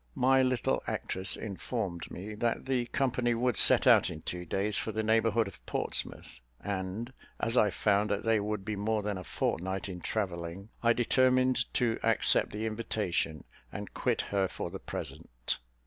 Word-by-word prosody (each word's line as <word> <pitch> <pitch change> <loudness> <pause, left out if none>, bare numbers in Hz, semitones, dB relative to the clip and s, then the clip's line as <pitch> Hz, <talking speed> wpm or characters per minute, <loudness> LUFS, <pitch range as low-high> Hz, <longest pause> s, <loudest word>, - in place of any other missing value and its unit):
My 130 +1 +4
little 130 -3 +1
actress 95 0 -1
informed 100 -3 -4
me 100 +4 -7
that 115 +2 -1
the 130 -2 0
company 125 -3 0
would 125 0 +1
set - - +8
out - - +6
in 80 -3 -8
two 90 0 -4
days 100 +4 -1
for 110 - -2
the 110 +1 -2
neighbourhood 115 0 +2
of 100 - -12
Portsmouth; 65 - -1 0.2
and, 100 +5 -4 0.3
as 115 - -1
I 105 -4 +5
found 100 +2 +1
that 100 0 -1
they 115 -1 +3
would 105 -1 -3
be 105 0 -2
more 105 +1 -1
than 105 -2 -2
a - - -7
fortnight 95 +3 -2
in 90 -2 -6
travelling, 90 -1 -3
I 115 0 +4
determined 130 +1 +2
to 120 -3 +1
accept 115 -1 +3
the 105 +2 -4
invitation, 105 -8 -2 0.3
and - - -7
quit - - 0
her 100 -1 0
for - - -6
the - - -6
present. - - -5
105 Hz, 170 wpm, -30 LUFS, 95-115 Hz, 0.3 s, set